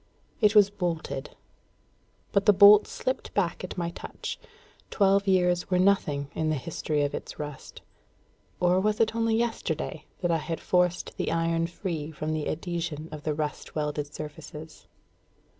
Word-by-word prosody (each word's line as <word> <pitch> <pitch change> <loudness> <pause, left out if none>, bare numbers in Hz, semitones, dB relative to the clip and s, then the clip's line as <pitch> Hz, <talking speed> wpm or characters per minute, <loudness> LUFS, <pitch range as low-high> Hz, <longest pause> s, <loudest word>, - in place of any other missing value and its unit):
It 210 0 +4
was 205 -1 +7
bolted. 170 -8 -4 0.9
But 200 +1 +1
the 210 - +8
bolt 205 +2 +8
slipped 255 - -3
back 185 -4 0
at 185 - -6
my 170 -1 -2
touch; - - -7 0.5
twelve 200 0 +3
years 180 -2 +2
were 180 - +2
nothing 155 -7 +2
in 160 -1 -1
the 155 - +1
history 150 +1 -2
of 145 - -1
its - - -6
rust; 150 -2 -8 0.8
or 180 +1 +3
was 210 +2 +1
it 220 -1 +3
only 225 -1 +2
yesterday 210 -10 -2 0.2
I 165 -1 +2
had 165 +1 -4
forced 180 -1 +1
the - - -1
iron 165 0 +1
free 170 -4 -4
from 155 0 -3
the 155 -1 -2
adhesion 165 -1 -4
of 155 -1 -7
the 150 0 -2
rust 150 -1 -4
welded 150 -1 -2
surfaces? 150 +1 -9
170 Hz, 155 wpm, -27 LUFS, 155-195 Hz, 0.9 s, the